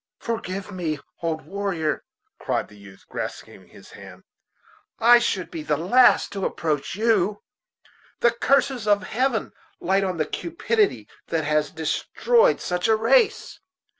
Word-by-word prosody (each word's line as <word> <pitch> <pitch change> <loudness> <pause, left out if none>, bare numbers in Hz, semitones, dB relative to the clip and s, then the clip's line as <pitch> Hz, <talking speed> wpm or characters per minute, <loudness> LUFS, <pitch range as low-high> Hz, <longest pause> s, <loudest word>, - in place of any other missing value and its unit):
"Forgive 200 -4 -5
me, 165 -5 -3 0.2
old 160 -3 -2
warrior," 185 -4 -2 0.4
cried - - -2
the 105 - -16
youth, 100 -1 -16
grasping - - -7
his - - -16
hand; - - -13 0.7
"I 240 +1 +7
should 195 -6 -2
be 160 - -5
the 150 -1 -1
last 240 - +4
to 200 - -5
reproach 155 -4 -2
you. 210 -2 +1 0.8
The 235 - +5
curses 260 -1 +1
of 205 -1 +3
Heaven 240 +2 -1 0.3
light 195 +3 +1
on 185 -2 -2
the 155 - 0
cupidity 400 +5 -1 0.2
that 165 -1 -1
has 150 0 +1
destroyed 470 - +1
such 180 +2 -1
a 220 - +4
race. 415 - +2
195 Hz, 135 wpm, -23 LUFS, 160-235 Hz, 0.8 s, I